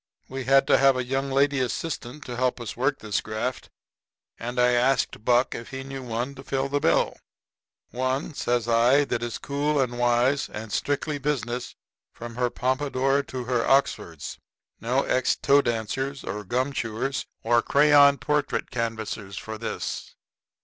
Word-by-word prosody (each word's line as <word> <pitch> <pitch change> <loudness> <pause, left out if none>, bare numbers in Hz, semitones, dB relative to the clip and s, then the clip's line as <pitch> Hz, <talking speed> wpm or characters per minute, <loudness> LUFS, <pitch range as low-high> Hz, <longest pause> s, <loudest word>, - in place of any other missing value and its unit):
We 130 -1 -5
had 135 +1 +5
to - - +4
have 135 -1 +5
a 130 - 0
young 135 +2 -2
lady 140 +1 +2
assistant 130 +1 -3
to 125 - -5
help 125 +1 0
us 120 - -6
work 135 +3 +1
this 105 -2 -2
graft; 110 +4 -4 0.7
and 120 +2 -4
I 125 0 +5
asked 125 -2 +1
Buck 120 +2 +3
if 115 - -7
he 135 -1 -6
knew 135 0 -6
of 130 - -9
one 120 +4 -2
to 135 0 -11
fill 135 0 -1
the 145 +1 +1
bill. 155 - +2 0.8
"One," 130 +4 -1
says 120 -4 0
I, 120 +5 +4
"that 115 - -2
is 120 -1 -3
cool 145 +1 -1
and 120 -2 -1
wise 120 +3 +2
and 105 0 -7
strictly 145 +1 -1
business 125 -4 -2 0.4
from 120 0 -8
her 125 +1 0
pompadour 135 +2 +1
to 130 -2 -6
her 120 -1 0
Oxfords. 85 - 0 0.4
No 125 +4 +1
ex 130 0 +1
toe 140 +1 +4
dancers 130 +4 -2
or 105 0 -4
gum 130 +7 -1
chewers 115 +3 -2 0.2
or 120 +1 +4
crayon 145 +1 +6
portrait 145 +4 -1
canvassers 110 -4 -4
for 110 0 -6
this." 115 - -5
130 Hz, 165 wpm, -25 LUFS, 120-140 Hz, 0.8 s, crayon